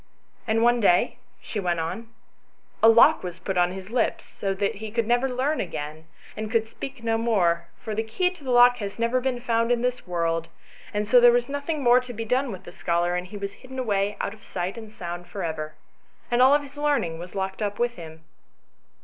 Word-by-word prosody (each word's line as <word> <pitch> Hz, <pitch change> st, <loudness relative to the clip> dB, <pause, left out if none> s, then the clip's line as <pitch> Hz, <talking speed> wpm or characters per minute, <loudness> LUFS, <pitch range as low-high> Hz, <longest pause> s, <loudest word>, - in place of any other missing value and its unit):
"And 225 Hz, +1 st, +2 dB
one 240 Hz, 0 st, +4 dB
day," 180 Hz, -5 st, +3 dB, 0.2 s
she 215 Hz, -, -4 dB
went 175 Hz, -3 st, 0 dB
on, 225 Hz, +8 st, -4 dB, 0.7 s
"a 225 Hz, -, +8 dB
lock 235 Hz, +7 st, +6 dB
was 180 Hz, -1 st, -6 dB
put 190 Hz, +1 st, -4 dB
upon 175 Hz, 0 st, +3 dB
his 190 Hz, +2 st, -8 dB
lips, 240 Hz, -1 st, -2 dB
and 195 Hz, -1 st, -1 dB
he 215 Hz, +1 st, -2 dB
could 230 Hz, +1 st, 0 dB
never 245 Hz, +3 st, +2 dB
learn 265 Hz, +5 st, 0 dB
again, 155 Hz, -2 st, -6 dB, 0.3 s
and 215 Hz, 0 st, -4 dB
could 225 Hz, -1 st, +1 dB
speak 265 Hz, +2 st, -8 dB
no 225 Hz, 0 st, +1 dB
more, 180 Hz, -7 st, +1 dB
for 220 Hz, -, -5 dB
the 215 Hz, -, 0 dB
key 360 Hz, +12 st, 0 dB
to 360 Hz, -5 st, -15 dB
the 260 Hz, -, -5 dB
lock 245 Hz, 0 st, +6 dB
has 200 Hz, -3 st, -5 dB
never 235 Hz, +2 st, +1 dB
been 255 Hz, -1 st, -1 dB
found 230 Hz, -1 st, +1 dB
in 240 Hz, 0 st, +1 dB
this 250 Hz, -4 st, -2 dB
world; 165 Hz, -2 st, -1 dB, 0.4 s
and 210 Hz, 0 st, -2 dB
so 245 Hz, +3 st, +7 dB
there 240 Hz, 0 st, +8 dB
was 240 Hz, 0 st, +1 dB
nothing 285 Hz, +1 st, -3 dB
more 245 Hz, 0 st, +6 dB
to 250 Hz, -1 st, -8 dB
be 225 Hz, 0 st, -5 dB
done 255 Hz, +3 st, +1 dB
with 190 Hz, -, -8 dB
the -, -, -10 dB
scholar, 175 Hz, 0 st, 0 dB
and 180 Hz, 0 st, -3 dB
he 205 Hz, +2 st, -8 dB
was 200 Hz, 0 st, -5 dB
hidden 260 Hz, 0 st, -12 dB
away 205 Hz, -5 st, 0 dB
out 200 Hz, -, -2 dB
of 220 Hz, -, -17 dB
sight 180 Hz, +1 st, -4 dB
and 220 Hz, -2 st, -9 dB
sound 175 Hz, -3 st, -7 dB
for 190 Hz, +2 st, -5 dB
ever, 155 Hz, -2 st, -4 dB, 0.6 s
and 240 Hz, +1 st, +3 dB
all 270 Hz, +3 st, +7 dB
his 285 Hz, -1 st, -11 dB
learning 285 Hz, -, 0 dB
was 175 Hz, +2 st, -9 dB
locked 190 Hz, +1 st, -3 dB
up 205 Hz, -1 st, -2 dB
with 240 Hz, 0 st, 0 dB
him." 160 Hz, -1 st, -11 dB
220 Hz, 220 wpm, -25 LUFS, 180-245 Hz, 0.7 s, a